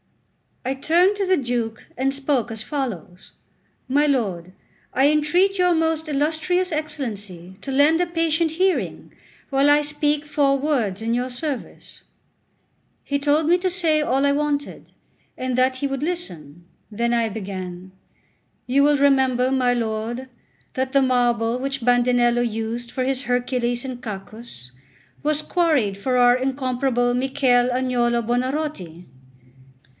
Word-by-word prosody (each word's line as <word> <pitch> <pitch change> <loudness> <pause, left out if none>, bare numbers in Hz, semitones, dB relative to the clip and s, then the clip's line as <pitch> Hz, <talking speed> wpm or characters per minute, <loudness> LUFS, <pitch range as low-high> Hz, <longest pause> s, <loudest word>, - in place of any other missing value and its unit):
I 260 - 0
turned 345 +8 +3
to 395 -2 -1
the 375 0 +3
Duke 240 -3 -3
and 270 +2 0
spoke 275 -3 0
as 220 -1 -3
follows: 220 - -5 0.5
"My 285 +3 +2
lord, 195 -11 -1 0.4
I 270 +3 +4
entreat 345 +6 +2
your 360 -1 +4
most 320 0 0
illustrious 315 +5 0
Excellency 210 - -5
to 275 - -5
lend 295 +5 +4
a 355 - +1
patient 330 -1 0
hearing 370 +3 -1 0.4
while 275 +1 +3
I 295 0 +5
speak 295 0 -1
four 280 -2 +2
words 240 -9 -1
in 230 +1 0
your 250 +2 -1
service." 265 +1 -6 1.0
He 280 0 -1
told 295 +2 +2
me 350 +2 +5
to 370 +1 0
say 330 -4 +1
all 275 -1 +1
I 280 - +3
wanted, 290 0 -2 0.5
and 255 -1 -2
that 255 +1 +2
he 280 - -1
would 270 0 -4
listen. 175 - -5 0.3
Then 235 +3 0
I 230 -1 +1
began: 185 -3 -7 0.8
"You 265 +3 +3
will 290 0 +4
remember, 265 -2 +3
my 255 -2 +2
lord, 235 +2 -3 0.4
that 260 0 -2
the 275 - +5
marble 240 -2 +1
which 270 -2 -3
Bandinello 245 -1 +3
used 230 +1 -3
for 260 - -2
his 265 +1 -1
Hercules 245 -1 -1
and 250 -2 -6
Cacus 200 - -9 0.5
was 305 0 0
quarried 295 - +1
for 250 +5 -1
our 245 0 +6
incomparable 255 -2 0
Michel 255 -1 +2
Agnolo 245 -2 +1
Buonarroti. 245 - -3
260 Hz, 140 wpm, -22 LUFS, 235-295 Hz, 1.0 s, our